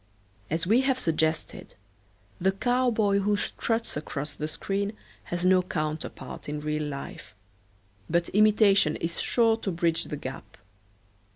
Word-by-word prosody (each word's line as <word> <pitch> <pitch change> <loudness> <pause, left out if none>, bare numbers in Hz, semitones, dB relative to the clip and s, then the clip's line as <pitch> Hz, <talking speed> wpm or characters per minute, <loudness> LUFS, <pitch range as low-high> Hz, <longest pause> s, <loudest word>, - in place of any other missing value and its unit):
As 165 +3 -1
we 225 +7 +4
have 265 -1 +1
suggested, 160 -5 -1 0.6
the 190 +2 +3
cowboy 225 -2 +2
who 205 +1 +1
struts 225 +2 -2
across 145 -1 -4
the 150 +1 -4
screen 200 +6 -2 0.3
has 175 +1 -3
no 185 0 +5
counterpart 155 -4 -4
in 150 0 -3
real 150 0 -2
life, 140 -6 -7 0.7
but 170 +1 +2
imitation 205 -5 +4
is 165 0 -3
sure 225 -2 +3
to 205 -3 -3
bridge 165 -1 0
the 150 - -5
gap. 135 -2 -8
180 Hz, 130 wpm, -27 LUFS, 155-210 Hz, 0.7 s, no